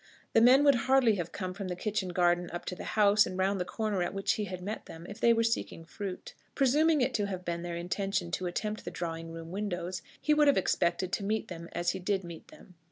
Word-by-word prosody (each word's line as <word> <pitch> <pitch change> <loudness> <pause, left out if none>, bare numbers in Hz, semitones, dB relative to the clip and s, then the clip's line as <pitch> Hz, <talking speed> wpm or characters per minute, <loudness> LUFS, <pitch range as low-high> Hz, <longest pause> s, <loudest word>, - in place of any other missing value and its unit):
The 225 - +5
men 255 +4 +7
would 285 -1 +7 0.2
hardly 265 -4 +5
have 175 -2 -4
come 185 -2 -4
from 195 0 -5
the 180 - -3
kitchen 200 0 -2
garden 175 -1 +2
up 175 - -6
to 180 - -4
the - - -8
house 210 0 +5
and 185 - -5
round 195 +1 +1
the - - -1
corner 210 -2 -2
at 175 - -2
which 195 - +1
he 210 - -2
had 185 -2 -6
met 205 +5 -6
them, 165 +1 -10
if 205 - -9
they 235 - +5
were 230 0 +3
seeking 225 -7 -2
fruit. 190 +2 -7 0.2
Presuming 295 +3 +3
it 250 +1 +1
to 205 -3 0
have 185 -2 -5
been 170 0 -2
their 175 0 -4
intention 180 +1 -2
to 180 +3 -2
attempt 210 +4 -3
the - - -5
drawing 165 -1 -5
room 165 0 -8
windows, 185 -2 -3 0.2
he 300 - +2
would 300 -1 +4
have 285 - +5
expected 180 0 +1
to - - -1
meet 215 +2 -1
them 170 -1 -8
as 175 0 0
he 190 - -5
did 190 +1 -1
meet 170 -2 -10
them. 305 -12 -16
190 Hz, 250 wpm, -30 LUFS, 175-215 Hz, 0.2 s, men